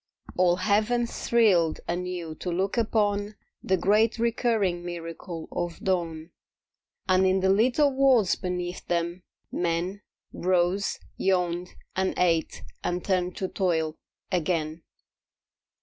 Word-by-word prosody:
All 180 -1 +4
Heaven 215 +5 +2
thrilled 200 -9 +2
anew 175 -2 -3
to 180 - -3
look 190 +3 0
upon 210 -2 +1 0.3
The 190 - +1
great 215 +5 +3
recurring 225 -6 +1
miracle 165 -1 -6
of 175 -1 -3
dawn. 170 -3 -2 0.8
And 185 0 +4
in 190 0 +2
the 190 0 +3
little 255 +7 +3
worlds 260 -7 +4
beneath 180 -1 -4
them 170 +1 -1 0.3
men 175 +3 -1 0.3
Rose, 185 +2 +1 0.2
yawned 180 -2 0 0.2
and 190 0 0
ate 165 -3 +1 0.2
and 175 0 -2
turned 180 -2 0
to 190 - -1
toil 160 -5 0 0.4
again. 165 -2 -1
185 Hz, 115 wpm, -27 LUFS, 175-205 Hz, 0.8 s, All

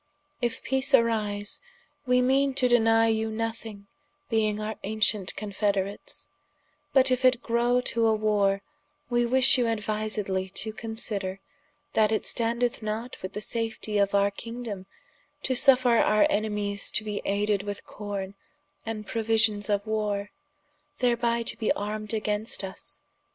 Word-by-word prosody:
If 240 -1 -2
peace 265 +1 +3
arise, 215 -4 0 0.5
we 250 0 +4
meane 270 +1 +2
to 255 - +2
deny 225 -2 +4
you 220 0 0
nothing, 225 -2 -5 0.5
being 215 -2 +1
our 215 +1 -3
ancient 210 -2 0
confederates: 200 -1 -2 0.6
but 260 -1 +4
if 255 0 +1
it 255 -1 +4
grow 240 +1 +2
to 230 -2 +1
a 220 - +4
warre, 205 -2 +1 0.5
we 240 0 +2
wish 260 +1 +5
you 245 - +2
aduisedly 210 -4 -2
to 220 0 0
consider, 210 -4 -4 0.5
that 215 -1 +3
it 220 - 0
standeth 235 +1 0
not 220 +3 -4
with 185 +1 -6
the 210 - -4
safetie 220 -2 -1
of 200 0 +1
our 200 0 +3
kingdome, 230 -3 -7 0.6
to 260 - 0
suffer 255 -2 +4
our 215 +6 +4
enemies 210 -3 -1
to - - +1
bee 210 -1 -3
ayded 205 0 +1
with 205 0 -6
corne, 200 -2 -5 0.5
and 220 -2 -5
prouisions 220 -1 +1
for 205 -1 +1
warre, 210 -2 -2 0.7
thereby 235 -1 +1
to - - 0
be 220 - 0
armed 210 +1 -4
against 215 0 -2
vs. 190 -1 -8
215 Hz, 140 wpm, -27 LUFS, 205-235 Hz, 0.7 s, wish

